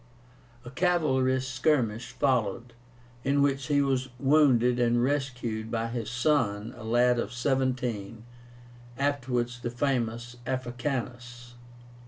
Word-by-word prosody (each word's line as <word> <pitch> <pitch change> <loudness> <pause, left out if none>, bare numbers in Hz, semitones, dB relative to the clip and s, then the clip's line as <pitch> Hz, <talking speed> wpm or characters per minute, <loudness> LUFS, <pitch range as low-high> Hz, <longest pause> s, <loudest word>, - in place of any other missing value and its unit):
A 120 - -8
cavalry 135 -6 +2
skirmish 130 -3 0
followed, 120 -3 0 0.5
in 140 +1 +2
which 135 -2 0
he 145 -1 +3
was 130 -1 0
wounded 130 -4 +4
and 120 0 +3
rescued 125 -5 -2
by 115 0 -2
his 115 -2 -4
son, 115 -5 0
a 120 - -11
lad 120 +2 +3
of - - -3
seventeen, 125 -4 -1 0.7
afterwards 125 -4 -1
the 120 - -3
famous 120 -2 -2
Africanus. 120 -1 -4
125 Hz, 110 wpm, -28 LUFS, 120-135 Hz, 0.7 s, wounded